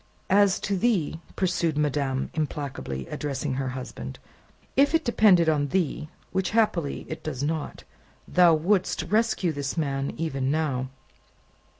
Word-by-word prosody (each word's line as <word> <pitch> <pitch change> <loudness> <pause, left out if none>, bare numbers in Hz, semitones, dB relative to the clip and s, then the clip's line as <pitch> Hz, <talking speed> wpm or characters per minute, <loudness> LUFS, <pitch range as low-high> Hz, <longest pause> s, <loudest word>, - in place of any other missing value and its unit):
"As 200 -1 +5
to 200 - -1
thee," 185 -7 +1 0.2
pursued 175 -4 0
madame, 140 -3 0
implacably, 140 - -3
addressing 140 -1 -3
her 130 0 -2
husband, 65 - -7 0.6
"if 285 +4 +4
it 325 - +1
depended 200 -8 +5
on 150 -2 +2
thee 155 -1 -1 0.2
which, 190 -1 0
happily, 175 -10 +1
it 160 - -6
does 140 -4 -4
not 155 0 -3 0.4
thou 175 -2 +5
wouldst 180 +1 +1
rescue 210 -1 +1
this 140 +1 -4
man 140 -3 -1
even 135 -5 -1
now." 140 -4 0
155 Hz, 130 wpm, -26 LUFS, 140-185 Hz, 0.6 s, As